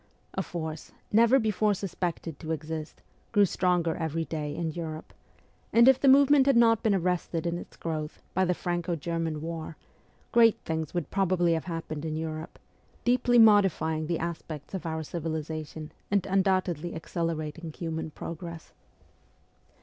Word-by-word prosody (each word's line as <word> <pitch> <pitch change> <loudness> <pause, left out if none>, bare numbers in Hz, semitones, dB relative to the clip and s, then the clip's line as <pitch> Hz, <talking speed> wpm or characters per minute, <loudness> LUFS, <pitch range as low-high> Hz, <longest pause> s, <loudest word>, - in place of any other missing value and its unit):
A 190 - -1
force, 160 -4 -6 0.2
never 230 +4 +6
before 215 -3 +1
sus 190 -2 -5
pected 170 -4 -3
to 160 - -5
exist, 155 0 -5 0.3
grew 205 -3 +5
stronger 175 -3 +1
every 160 0 -2
day 150 -2 -4
in 165 -2 -2
Europe; 155 -1 -6 0.6
and 235 +2 +6
if 265 -1 +7
the 275 - +2
movement 275 0 +6
had 275 -3 +5
not 225 -1 +5
been 215 -3 +2
arrested 180 -2 -1
in 170 0 -1
its - - -12
growth 155 -2 -4
by 190 - +2
the 180 -1 +1
Franco 175 0 -2
German 165 -1 -3
war, 165 -1 -5 0.5
great 230 -2 +6
things 160 0 -3
would 170 -5 -2
probably 185 -3 +2
have 160 - -2
happened 165 -3 -5
in 155 -1 -3
Europe, 160 0 -5 0.5
deeply 245 0 +3
modifying 195 -8 +4
the 170 0 0
aspects 165 -2 -6
of 185 -3 -4
our 160 0 -2
civilization, 155 -1 -5 0.2
and 200 -2 +1
undoubtedly 185 -4 +1
accelerating 165 0 -3
human 160 0 -4
progress. 170 +1 -8
170 Hz, 150 wpm, -28 LUFS, 160-190 Hz, 0.6 s, if